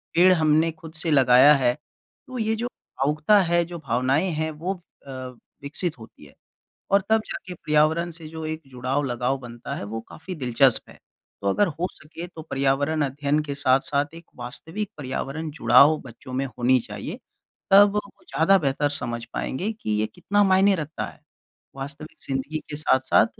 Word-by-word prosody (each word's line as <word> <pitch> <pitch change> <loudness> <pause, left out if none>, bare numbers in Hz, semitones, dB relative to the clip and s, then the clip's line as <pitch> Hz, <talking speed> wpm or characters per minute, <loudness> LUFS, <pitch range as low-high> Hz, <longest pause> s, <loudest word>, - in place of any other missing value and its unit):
पेड़ 185 +2 +7
हमने 160 0 +3
खुद 160 0 -12
से 165 - 0
लगाया 130 +1 +7
है। 125 -3 +2 0.5
तो 255 -1 -7
ये 220 0 +1
जो 240 +2 -2
भावुकता 155 - +1
है, 175 -1 +2
जो 175 0 -7
भावनाएँ 135 +5 +1
हैं, 160 0 -2
वो 175 +4 -4 0.3
अ, 135 - -7 0.5
विकसित 150 +3 -2
होती 110 -8 -14
हैं, 70 - -17 0.6
और 200 - +5
तब 220 0 +5
जाके 180 - -6
पर्यावरण 160 +2 +2
से 165 -1 -9
जो 160 0 -7
एक 155 0 -4
जुड़ाव, 130 +3 -1
लगाव 125 +1 -1
बनता 120 -2 -7
है, - - -5
वो 110 +2 -5
काफ़ी 180 +3 -8
दिलचस्प 125 -3 +3
है। - - -15 0.4
तो - - -4
अगर 205 - +3
हो 170 +1 -2
सके 165 +3 -9
तो 165 -3 -10
पर्यावरण 140 +1 0
अध्ययन 145 +2 0
के 145 -2 -4
साथ-साथ 140 +2 +1
एक 165 0 -11
वास्तविक 165 - -5
पर्यावरण-जुड़ाव 140 0 +3
बच्चों 130 +1 -11
में 130 +2 -1
होनी 125 +1 +2
चाहिए, - - -6 0.5
तब 200 +1 +8
वो 210 - +2 0.3
ज़्यादा 195 +5 +4
बेहतर 145 -1 0
समझ 120 -1 -4
पाएँगे 190 +11 -2
कि 110 - -4
ये 110 - +1
कितना 205 +3 +2
मायने 195 +1 +5
रखता 160 -3 -4
है। - - -13 0.6
वास्तविक 145 +4 -7
ज़िंदगी 140 +3 -2
के 145 - -4
साथ-साथ 130 -3 +3
150 Hz, 170 wpm, -24 LUFS, 135-170 Hz, 0.6 s, तब